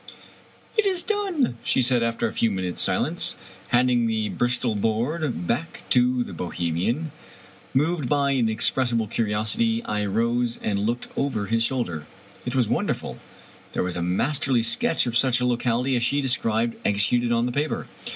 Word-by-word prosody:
" - - -26
It 420 - +4
is 370 -3 0
done! 390 - 0
" - - -26
she 130 - +2
said, 125 -1 +2
after 115 0 0
a - - -6
few 115 - +2
minutes* 95 -3 -2
silence, - - 0 0.3
handing 120 -1 +3
the 110 -1 0
Bristol 120 -1 0
board 115 - -1
back 145 - -2
to 125 0 +4
the - - -9
Bohemian. 90 - -2 0.6
Moved 150 -1 +1
by 140 -1 +2
an 130 -4 +2
inexpressible 115 +1 +1
curiosity, 110 +1 0
I 105 -1 -1
rose 115 +3 0
and 100 -2 0
looked 115 +4 -2
over 130 -7 -1
his 115 +3 +1
shoulder. 115 - -1 0.4
It 125 - -2
was 125 -4 +3
wonderful! - - -2 0.5
There - - 0
was 90 -1 -3
a 85 - -2
masterly 120 - +1
sketch 115 +2 +1
of 120 -2 -2
such 125 0 +3
a 125 - 0
locality 125 +1 +1
as 120 - +1
she 130 +4 +1
described 115 -4 0
executed 120 +4 +2
on 115 0 +2
the 125 - -1
paper. 145 +4 -2
120 Hz, 170 wpm, -24 LUFS, 110-130 Hz, 0.6 s, It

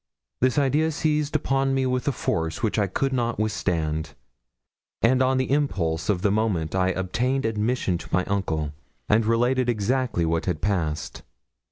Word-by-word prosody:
This 130 +1 +2
idea 145 +3 +2
seized 150 -1 0
upon 135 -2 +1
me 135 0 +1
with 125 +1 -1
a - - +4
force 80 -1 -2
which 110 0 +1
I 100 - +2
could 135 +8 -1
not 120 -2 0
withstand; 80 -8 -1 0.9
and 130 +3 +4
on 130 0 +3
the 130 0 -1
impulse 90 - 0
of 95 -3 +1
the 100 - +3
moment 100 -7 0
I 95 0 +2
obtained 120 +9 -1
admission 110 -4 0
to - - -10
my 90 +1 +1
uncle, 80 -7 -1 0.3
and 110 +2 +4
related 120 +2 +2
exactly 120 -4 0
what 80 +2 -1
had 90 -4 0
passed. 85 -6 -2
110 Hz, 165 wpm, -25 LUFS, 90-130 Hz, 0.9 s, a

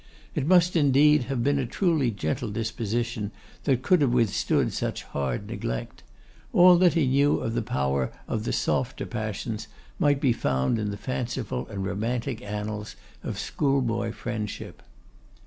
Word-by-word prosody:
It 135 - -1
must 180 0 +5
indeed 150 -2 +5
have 130 -2 -2
been 140 +1 +2
a 130 - -1
truly 155 - +1
gentle 100 +2 -2
disposition 115 0 -2 0.4
that 130 -3 +2
could 180 +1 +4
have 140 - +4
withstood 115 -4 +1
such - - -3
hard 70 -3 -3
neglect. - - -4 0.5
All 180 0 +8
that 180 -1 +4
he 165 -4 +3
knew 140 +3 +3
of 115 - -3
the 120 - 0
power 70 - -1 0.2
of - - -2
the - - -2
softer - - -1
passions 110 -1 -4 0.3
might 145 -2 +3
be 130 -4 +3
found 65 - 0
in 105 -1 -1
the 100 - -4
fanciful 120 - -3
and 100 -1 -4
romantic 115 +4 -2
annals 105 0 -5 0.3
of - - -4
schoolboy 130 -5 0
friendship. 110 -2 -5
120 Hz, 150 wpm, -26 LUFS, 105-140 Hz, 0.5 s, All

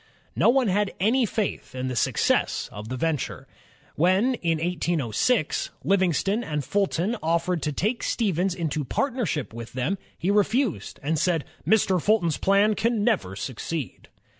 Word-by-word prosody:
No - - +4
one 255 -1 +3
had 205 +1 0
any 230 +5 +3
faith 205 - -3
in 130 0 -3
the 130 - -3
success - - +1
of 105 +2 -8
the 130 - -3
venture. 155 -1 -2 0.5
When, 190 - +3
in 165 -8 0
1806, 170 - 0
Livingston 195 +3 +1
and 150 - -3
Fulton 200 - 0
offered 165 +1 0
to 150 - -1
take 215 - -1
Stevens 190 -4 0
into 155 -3 -2
partnership 200 - -2
with 115 0 -8
them, 130 +10 -1 0.2
he 185 - 0
refused, 210 - 0
and 155 +2 0
said, 165 -2 +1 0.2
"Mr. 190 -5 +3
Fulton's 190 -6 +2
plan 200 +2 +3
can 225 0 0
never 190 - 0
succeed." 130 +6 -5
180 Hz, 145 wpm, -25 LUFS, 150-210 Hz, 0.5 s, No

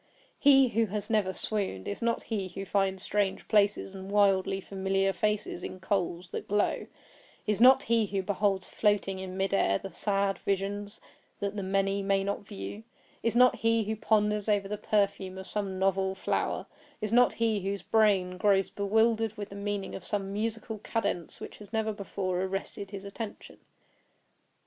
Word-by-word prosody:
He 270 -2 +6
who 225 0 +1
has 205 +2 -4
never 210 -4 +2
swooned, 190 - -3
is 205 - -4
not 230 0 0
he 205 -4 -2
who 195 +2 -6
finds 190 -1 0
strange 205 -3 -1
palaces 205 -2 +2
and 190 0 -8
wildly 195 -1 +3
familiar 195 0 0
faces 210 -1 -1
in 185 - -6
coals 180 -2 -1
that - - -5
glow; 205 +1 0 0.6
is 210 +1 0
not 255 +2 +8
he 225 -2 +2
who 195 -1 -2
beholds 195 -1 0
floating 205 -3 +1
in 190 0 -6
mid 195 +1 0
air 100 - +3
the 195 - -8
sad 195 +2 0
visions 200 +1 -2 0.4
that 200 0 -2
the 205 - -2
many 195 +1 0
may 195 0 +1
not 200 +1 -1
view; 205 +1 -6 0.4
is 230 0 0
not 250 +1 +6
he 225 0 +2
who 215 +1 -2
ponders 210 -1 +1
over 200 -2 +2
the 210 - -3
perfume 200 -3 0
of 190 - -7
some 195 -2 -3
novel 190 0 +1
flower; 190 - -1 0.3
is 215 -1 -3
not 245 +1 +5
he 225 -2 +1
whose 195 +1 -3
brain 195 -5 +2
grows 195 -1 +3
bewildered 220 +2 +1
with 205 0 -5
the 200 - -9
meaning 200 -1 -3
of 185 - -7
some 195 0 -3
musical 220 +1 -3
cadence 200 -6 -3
which - - -9
has 205 -2 -12
never 220 -1 0
before 190 -3 -3
arrested 195 +1 -4
his 200 0 -7
attention. 205 +2 -7
200 Hz, 175 wpm, -29 LUFS, 195-215 Hz, 0.6 s, not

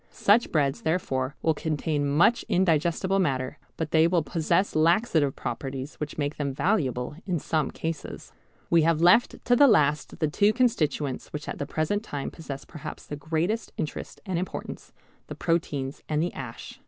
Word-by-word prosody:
Such 215 +4 +3
breads 140 -3 +1
therefore 145 -5 -1
will 160 - +3
contain 150 -1 -1
much 170 +11 +4
indigestible 175 +2 +2
matter, 130 -7 -1 0.2
but 160 -2 -3
they 160 0 +5
will 170 -2 +2
possess 170 +5 0
laxative 160 - +3
properties 135 +3 -5
which 150 -1 -5
make 145 0 -2
them 140 -2 -2
valuable 140 - 0
in 180 -3 0
some 155 -1 -1
cases. 165 0 -6 0.4
We 170 -1 +6
have 160 0 +2
left 180 +8 +5
to 245 - +4
the 285 +3 +7
last 150 - +2
the 155 - +1
two 205 +8 +3
constituents 155 - 0
which 150 - -6
at - - -5
the 140 - -3
present 160 +8 -1
time 145 -10 -5
possess 140 -4 -8
perhaps 155 -2 -8
the 145 - -5
greatest 160 +9 -2
interest 155 - -5
and 185 -4 -1
importance, 185 - -6 0.4
the - - -7
proteins 145 -5 -1
and 150 -1 +1
the 175 +3 -1
ash. 120 -3 -8
155 Hz, 165 wpm, -26 LUFS, 145-175 Hz, 0.4 s, the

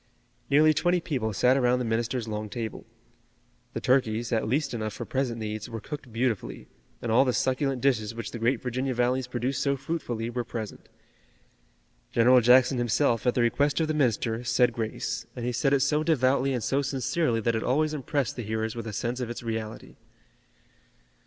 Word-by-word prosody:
Nearly 155 +2 +5
twenty 175 +3 +2
people 130 -10 -2
sat 125 +6 +3
around 125 -2 +3
the 125 - -2
minister's 115 +1 -1
long 105 0 -4
table. 110 0 -6 0.9
The - - -2
turkeys, 120 -3 +1
at 110 -2 +1
least 140 +4 0
enough 110 -2 -3
for - - -6
present 130 -3 -1
needs, 110 0 -4
were 115 -1 -5
cooked 145 +1 -8
beautifully, 115 -2 -2 0.4
and 115 - -1
all 115 - +6
the 130 -2 0
succulent 130 0 0
dishes 115 -5 +1
which 115 -3 -5
the 120 - -6
great 120 +4 +1
Virginia 130 +1 -2
valleys 125 +1 +1
produce 125 +2 -2
so 140 -1 +1
fruitfully 120 -6 -3
were 120 0 -2
present. 115 -3 -7 1.2
General 125 +2 +5
Jackson 125 +2 +5
himself, 120 0 +1
at 125 - +2
the 125 - +2
request 140 +6 +2
of 160 - +1
the 155 - 0
minister, 120 -4 0
said 125 0 +2
grace, 115 +1 -3
and 120 -2 -4
he 125 - 0
said 135 +3 +1
it 140 -1 +3
so 150 +3 +2
devoutly 135 -3 +2
and 125 -4 -2
so 140 +1 +1
sincerely 135 -1 0
that 115 +1 0
it 110 - -1
always 150 +6 +1
impressed 140 -2 -2
the 125 - -4
hearers 110 0 -3
with 115 -1 -5
a 110 - -5
sense 120 +4 -2
of 125 -2 -3
its 120 - -6
reality. 110 -1 -5
125 Hz, 190 wpm, -27 LUFS, 115-135 Hz, 1.2 s, all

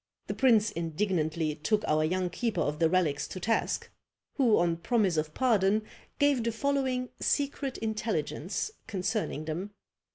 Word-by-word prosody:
The - - -3
prince 225 -5 +4
indignantly 165 -3 -1
took 185 +8 0
our 155 0 +3
young 180 +2 0
keeper 220 -3 -1
of 150 +1 -1
the 165 -1 +4
relics 160 -5 +1
to 185 - -7
task; 225 +5 -1 0.4
who, 245 -7 +4
on 170 -1 +2
promise 195 0 +1
of 155 0 -2
pardon, 215 -4 +3 0.3
gave 285 -4 +3
the 230 - 0
following 260 0 0
secret 280 -2 0
intelligence 215 - -2 0.2
concerning 190 -5 -2
them. 180 +6 -4
200 Hz, 140 wpm, -29 LUFS, 165-230 Hz, 0.4 s, prince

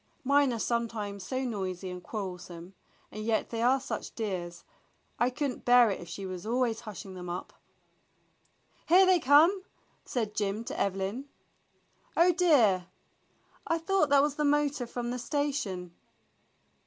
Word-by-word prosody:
"Mine 280 0 +3
are 235 - -2
sometimes 220 -4 -2
so 260 +5 -3
noisy 190 -6 -4
and 180 0 -7
quar 210 +2 -5
relsome, 180 -1 -9 0.4
and 215 - -6
yet 220 0 0
they 230 -1 -2
are 255 +3 +4
such 265 - -6
dears, 180 -6 -4 0.6
I 240 - +3
could 275 +2 -2
n't - - -11
bear 245 -2 +6
it - - -3
if 170 - -10
she 195 +3 -6
were 185 -1 -5
always 235 0 0
hushing 210 -4 -9
them 180 -1 -7
up." 175 +1 -5 1.3
"Here 370 +3 +7
they 370 -1 +4
come!" 315 +7 +5 0.4
said 220 -4 -3
Jim 205 +1 -2
to - - -6
Evelyn. 195 +7 -2 0.9
"Oh, 345 +2 +6
dear, 240 - +4 0.8
I 330 - +1
thought 330 -2 +1
that 280 0 +5
was 295 -1 -1
the 300 - 0
motor 290 -3 +1
from 240 0 -4
the 250 - -3
station." 245 - -2
235 Hz, 155 wpm, -29 LUFS, 195-280 Hz, 1.3 s, Here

